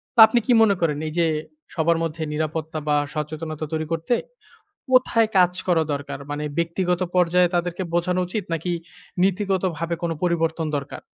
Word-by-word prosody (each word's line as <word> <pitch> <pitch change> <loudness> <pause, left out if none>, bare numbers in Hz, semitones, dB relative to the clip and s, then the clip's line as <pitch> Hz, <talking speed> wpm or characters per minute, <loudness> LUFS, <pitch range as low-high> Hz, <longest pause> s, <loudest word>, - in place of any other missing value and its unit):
তো - - +1
আপনি 240 - +2
কি - - +1
মনে 210 -3 +5
করেন 150 -3 +1
এই 155 - -5
যে, 170 - +4 0.5
সবার 165 0 +2
মধ্যে 160 0 -4
নিরাপত্তা 155 +1 -3
বা 150 - +4 0.2
সচেতনতা 155 0 -4
তৈরি 160 0 -1
করতে 165 +8 0 0.8
কোথায় 235 -3 +4
কাজ 180 0 +5 0.2
করা 170 -3 +4
দরকার? 140 0 -4
মানে 145 +1 -3
ব্যক্তিগত 175 +1 0 0.2
পর্যায়ে 180 0 +3
তাদেরকে 175 +1 -1
বোঝানো 180 +1 +1
উচিত? 195 +2 -3
নাকি 165 +2 -1 0.5
নীতিগত 195 0 +1
ভাবে 170 +2 -2
কোন 170 - 0
পরিবর্তন 165 -2 0
দরকার? 140 0 -6
170 Hz, 160 wpm, -23 LUFS, 160-180 Hz, 0.8 s, মনে